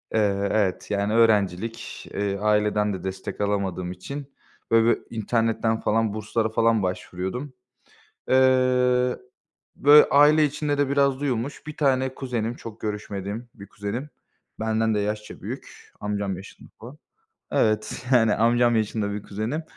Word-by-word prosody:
Eee, 100 -2 +1
evet, 105 -2 0
yani 100 +1 0
öğrencilik. 110 -1 +1
Eee, 100 -1 -1
aileden 105 0 +1
de 95 -1 -6
destek 95 +2 -5
alamadığım 95 -3 -1
için 140 +10 -8 0.4
böyle 115 0 +5
bir 115 -1 -2
internetten 115 0 0
falan 110 -1 +1
burslara 110 +1 -1
falan 115 -2 +2
başvuruyordum. 95 +9 -4 0.8
Eee, 125 -1 +3 0.6
böyle 150 +1 +7
aile 150 +2 +6
içinde 145 0 -2
de 145 -1 +1
biraz 140 -1 +2
duyulmuş. 135 +1 -3
Bir 150 - -7
tane 130 -2 +1
kuzenim, 120 -3 -3
çok 115 -3 -10
görüşmediğim 105 +2 -5
bir 100 -2 -11
kuzenim. 105 +9 -5 0.5
Benden 110 0 +1
de - - +1
yaşça 105 +1 -4
büyük, - - -9
amcam 100 -2 -2
yaşında 95 - -13
bu. 125 +6 -10 0.6
Evet, 110 +3 0
yani 115 -4 +5
amcam 120 +1 +3
yaşında 110 -1 -1
bir 105 0 -5
kuzenim. 110 +10 -3
110 Hz, 135 wpm, -24 LUFS, 105-125 Hz, 0.8 s, böyle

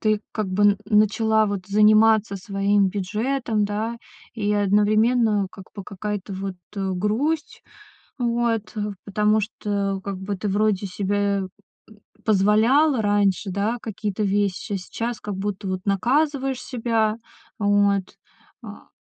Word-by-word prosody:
ты, 215 -1 +1
как 215 -3 -2
бы, 190 +2 0
н 205 -1 +4
начала, 215 +1 +3
вот, 195 -2 -4
заниматься 215 0 +4
своим 200 0 +1
бюджетом, 215 +4 -1
да, 215 +3 -3 0.4
и 210 -2 -1
одновременно, 210 +1 +3
как 190 - -12
бы, 200 - -6
какая-то 205 0 -5
вот, 190 0 -4 0.2
э, 195 -1 -1
грусть. 255 - -1 0.6
Вот, 235 -2 -1 0.3
потому 210 +1 +2
что, 200 -2 -2
как 195 -2 -4
бы, 195 +1 -4
ты 205 +2 -3
вроде 205 0 +1
себе 195 +2 -2
м, 200 -2 0 0.4
м, 215 - -17 0.3
позволяла 220 +7 +3
раньше, 205 -1 +1
да, 205 +5 -1
какие-то 210 -1 -3
вещи, 200 +1 -1
а - - +1
сейчас 230 +5 -5
как 205 -2 -5
будто 195 -1 -4
вот 185 0 -2
наказываешь 270 +6 +1
себя. 225 -3 0 0.4
Вот. 205 -2 +1 0.5
А - - -11
205 Hz, 135 wpm, -23 LUFS, 200-220 Hz, 0.6 s, н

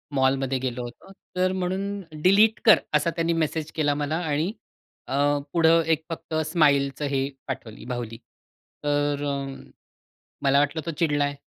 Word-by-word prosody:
मॉलमध्ये 135 0 +2
गेलो 125 -1 -3
होतो. 120 +10 -10 0.2
तर 185 0 +2
म्हणून 190 +2 -2 0.2
डिलीट 210 +5 +5
कर 215 - +8
असा 150 +2 +3
त्यांनी 165 0 +1
मेसेज 160 -1 -1
केला 145 -2 +2
मला 150 +2 -1
आणि 155 +7 0 0.6
अ, 130 - -4 0.4
पुढे 165 -1 +4 0.2
एक 160 0 +1
फक्त 165 -1 -7
स्माईलचं 145 -3 +2
हे 135 0 0 0.2
पाठवली 130 -5 -6
बाहुली. 120 -2 -5 0.7
तर 145 0 0
अ, 140 -1 0 1.1
मला 140 0 +4
वाटलं 145 +2 0
तो 165 - -2
चिडलाय 145 -3 +1
145 Hz, 140 wpm, -25 LUFS, 135-165 Hz, 1.1 s, कर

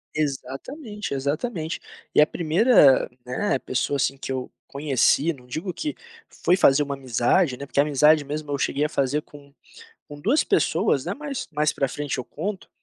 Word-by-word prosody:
Exatamente, 155 - -4
exatamente! 155 - -3 0.3
E - - +6
a 150 - +5
1ª, 170 - +4 0.2
né, 135 +9 0
pessoa 130 +3 -1
assim 135 - 0
que 135 - -6
eu 130 -1 -4 0.2
conheci, 140 +3 +2
não 125 -4 -17
digo 165 +9 -4
que 300 - -4 0.5
foi 180 - +5
fazer 145 -5 +4
uma 140 -1 -4
amizade, 130 +3 +1
né, 140 - -7
porque 140 - -2
a - - +7
amizade 150 +1 +4
mesmo 150 +1 -5
eu 140 - 0
cheguei 145 +3 0
a - - -2
fazer 140 0 0
com 145 -1 -16 0.6
com 145 0 -10
2 245 - +3
pessoas, - - +1
né, - - -3
mas 285 -2 -5
mais 150 0 +1
para 135 - -1
frente 145 0 -4
eu 130 - -3
conto, 200 - -5
145 Hz, 180 wpm, -24 LUFS, 135-170 Hz, 0.6 s, a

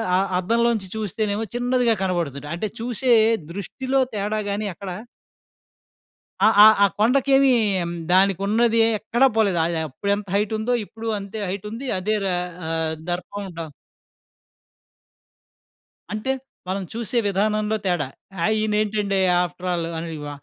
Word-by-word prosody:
అ - - +4 0.2
అద్దంలోంచి 230 0 +1
చూస్తేనేమో 215 0 -2
చిన్నదిగా 245 -1 +2
కనపడుతుదట. 160 -6 -2
అంటే, 210 +5 -2
చూసే 245 +2 -1 0.4
దృష్టిలో 260 +8 -2
తేడా 210 +1 -1
గానీ 205 +1 -2
అక్కడ 195 +2 -8 1.5
ఆహ్, 220 - +5
ఆహ్, 220 -1 +8
ఆ - - +8
కొండకేమీ, 270 +3 +4 0.6
దానికున్నదీ 200 +5 +3 0.2
ఎక్కడా 240 +4 +3
పోలేదు. 200 -6 +2
ఆహ్, 160 - +2
అది 165 -2 -1
అప్పుడెంత 200 +8 -2
హైటుందో 220 +3 0
ఇప్పుడు 225 +2 -8
అంతే 200 +2 -8
హైటుంది. 210 +7 -5
అదే 215 +3 0
ర - - +1 0.4
ఆహ్, 160 -1 -1 0.2
దర్పం 185 +3 -4
డ 165 -1 -4 2.5
అంటే, 215 +5 -1 0.4
మనం 195 +1 -2
చూసే 230 0 -3
విధానంలో 210 +2 +1
తేడా. 175 -7 0 0.4
ఆ! - - +3 0.2
ఈనేంటండి 210 -2 0 0.2
ఆఫ్‌ట్రల్ 175 -1 -3
ఆహ్, 160 - -4
ని 160 - -6
వ 145 - -5
210 Hz, 120 wpm, -23 LUFS, 190-225 Hz, 2.5 s, ఆహ్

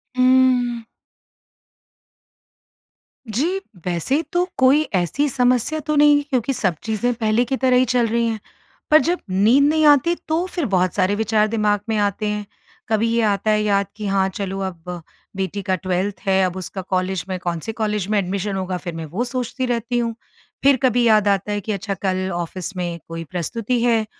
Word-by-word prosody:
उम्म 255 -2 +3 2.4
जी, 305 - 0 0.3
वैसे 180 - 0
तो 355 +1 +2
कोई 270 +3 +5
ऐसी 185 - +1
समस्या 250 +4 +1
तो 305 - +1
नहीं 290 0 +5
क्योंकि 255 0 0
सब 185 -8 0
चीज़ें 230 +2 0
पहले 225 +1 +1
की 265 +2 -2
तरह 255 -1 +2
ही 255 - +4
चल 240 -1 +1
रही 235 +1 +1
हैं। 225 -1 -2 0.5
पर 310 - +8
जब 350 +2 0
नींद 215 +9 +4
नहीं 310 0 +2
आती, 295 +4 +5
तो 325 +3 0
फिर 345 -5 -2
बहुत 185 -3 +1
सारे 195 +1 +2
विचार 215 0 +2
दिमाग़ 210 -2 +1
में 220 - +1
आते 205 +1 0
हैं। 210 0 -2 0.4
कभी 225 +1 +2
ये 235 - +2
आता 210 0 +1
है 215 - +2
याद 200 -2 +1
कि 215 - -6
हाँ, 195 -1 +2
चलो, 195 0 -4
अब 180 -2 -6 0.3
बेटी 190 +1 -3
का 190 -1 0
12th 185 +2 -2
है, 190 0 +3
अब 180 - -3
उसका 185 +1 -6
कॉलेज 185 -1 -2
में 185 - -2
कौन 175 -1 -3
से 225 - -5
कॉलेज 210 -3 -2
में 215 - +2
एडमिशन 195 +2 -2
होगा, 185 -1 -2
फिर 175 -1 -6
मैं 165 - -5
वो 180 +11 -3
सोचती 255 +1 -3
रहती 240 0 -1
हूँ। 230 -1 -1 0.5
फिर 280 -1 +6
कभी 245 -1 +3
याद 215 -2 +4
आता 200 +1 +1
है 205 - -1
कि 215 - -4
अच्छा 200 0 -3
कल 185 0 0
ऑफ़िस 180 +3 -5
में 175 -1 -3
कोई 165 0 -6
प्रस्तुति 230 +8 -2
है, 230 -2 +2
215 Hz, 185 wpm, -21 LUFS, 190-250 Hz, 2.4 s, पर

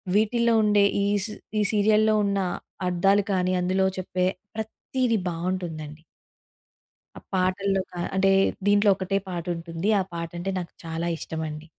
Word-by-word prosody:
వీటిల్లో 235 +2 +3
ఉండే 205 -1 +4 0.2
ఈస్ 205 +1 +1 0.3
ఈ - - +3
సీరియల్‌లో 215 +1 +4
ఉన్న 200 0 0 0.5
అర్థాలు 195 +3 +3
కానీ 185 0 +1
అందులో 185 +1 +1
చెప్పే 180 0 -1 0.3
ప్రతీది 230 +2 -1
బావుంటుందండి. 165 -3 -4 1.2
ఆ - - -7 0.2
పాటల్లో 190 +1 +1
కా 175 - -7 0.2
అంటే 195 0 +4 0.4
దీంట్లో 205 0 +5
ఒకటే 195 +1 -1
పాటుంటుంది. 170 0 -4
ఆ - - -1
పాట 170 0 -4
అంటే 195 +2 -2
నాకు 175 - -7
చాలా 165 +1 -2
ఇష్టమండి. 160 -1 -5
185 Hz, 125 wpm, -25 LUFS, 170-205 Hz, 1.2 s, దీంట్లో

